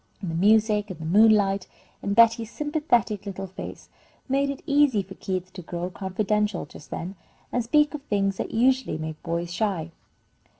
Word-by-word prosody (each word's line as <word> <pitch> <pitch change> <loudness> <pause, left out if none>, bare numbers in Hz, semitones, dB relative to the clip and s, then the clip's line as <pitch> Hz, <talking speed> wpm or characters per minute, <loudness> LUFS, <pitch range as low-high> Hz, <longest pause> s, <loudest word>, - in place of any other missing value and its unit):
And 180 -4 -4
the - - -3
music, 210 +2 +3
and 180 -4 -7
the 160 - -6
moonlight, 200 +1 +4 0.3
and 200 0 -1
Betty's 230 0 +5
sympathetic 245 - 0
little 195 0 -5
face, 190 0 -9 0.4
made 275 +1 +1
it 280 0 -5
easy 280 -8 +3
for 190 +1 -11
Keith 185 -1 -4
to 185 - -7
grow 175 +1 -5
confidential 205 +1 -1
just 145 - -14
then, 180 +3 -5 0.4
and 245 - 0
speak 300 +5 +3
of 300 - -5
things 195 -5 0
that - - -3
usually 255 -5 +2
make 155 0 -6
boys 170 +1 -3
shy. 185 -5 -1
205 Hz, 170 wpm, -25 LUFS, 185-230 Hz, 0.4 s, Betty's